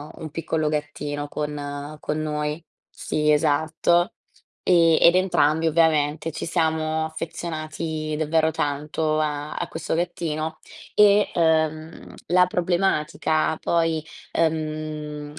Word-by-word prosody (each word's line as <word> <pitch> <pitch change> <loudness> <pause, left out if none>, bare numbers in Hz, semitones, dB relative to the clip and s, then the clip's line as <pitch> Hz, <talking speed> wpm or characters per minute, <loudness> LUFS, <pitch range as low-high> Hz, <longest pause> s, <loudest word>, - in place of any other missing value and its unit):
un 160 - -7
piccolo 160 0 -1
gattino 150 -1 -3
con 145 0 -5
con 150 - -3
noi. 150 +1 -3 0.3
Sì, 150 0 0
esatto. 160 +3 +2 0.5
E 165 -3 +4
ed 170 - +7
entrambi 165 -4 +2
ovviamente 160 -1 +2
ci 160 - -5
siamo 160 -1 0
affezionati 155 -1 -4
davvero 160 +1 +2
tanto 150 +2 -1
a 150 -1 -2
a - - -3
questo 160 - -3
gattino. 160 -2 -3 0.4
E, 205 0 +5
uhm, 160 -1 0
la 180 +1 +5
problematica 170 -3 0
poi, 165 -2 +1 0.3
uhm, 155 -2 -2
155 Hz, 105 wpm, -24 LUFS, 150-165 Hz, 0.5 s, ed